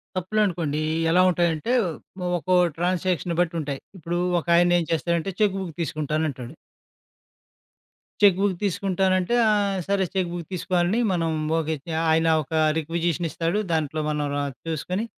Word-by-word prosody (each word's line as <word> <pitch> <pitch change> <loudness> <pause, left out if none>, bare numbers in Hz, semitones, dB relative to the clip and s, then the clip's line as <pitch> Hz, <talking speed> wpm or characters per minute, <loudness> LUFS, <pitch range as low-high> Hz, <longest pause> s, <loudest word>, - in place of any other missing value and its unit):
తప్పులునుకోండి. 180 -6 0 0.3
ఎలా 180 +2 +5
ఉంటాయంటే 175 +4 0 0.7
ఒకో 185 +2 +1 0.2
ట్రాన్సాక్షన్ 175 -1 -1
బట్టి 170 -1 +1
ఉంటాయి. 140 -2 -4 0.2
ఇప్పుడు 175 0 -3 0.2
ఒకాయనేం 175 0 +3
చేస్తాారంటే 170 +3 0
చెక్కు 200 -2 +2
బుక్కు 170 -5 -6
తీసుకుంటానంటాడు. 150 -4 -2 1.7
చెక్కు 195 -3 +6
బుక్కు 190 -4 +1
తీసుకుంటానంటే 190 +2 +1
ఆహ్, 200 -2 +1
సరే 195 -1 +1
చెక్కు 185 -2 0
బుక్కు 170 -3 -6
తీసుకోవాలని 180 +4 0
మనం 165 -2 0 0.3
ఓకే. 160 0 -1 0.4
ఆయన 160 +1 +3 0.2
ఒక 150 - -11 0.2
రిక్విజేషన్ 165 +1 -1
ఇస్తాడు, 170 +7 -1
దాంట్లో 155 -1 -1
మనం 150 -1 -1
ర - - 0 0.3
చూసుకొని, 180 +7 -2
175 Hz, 120 wpm, -24 LUFS, 160-185 Hz, 1.7 s, చెక్కు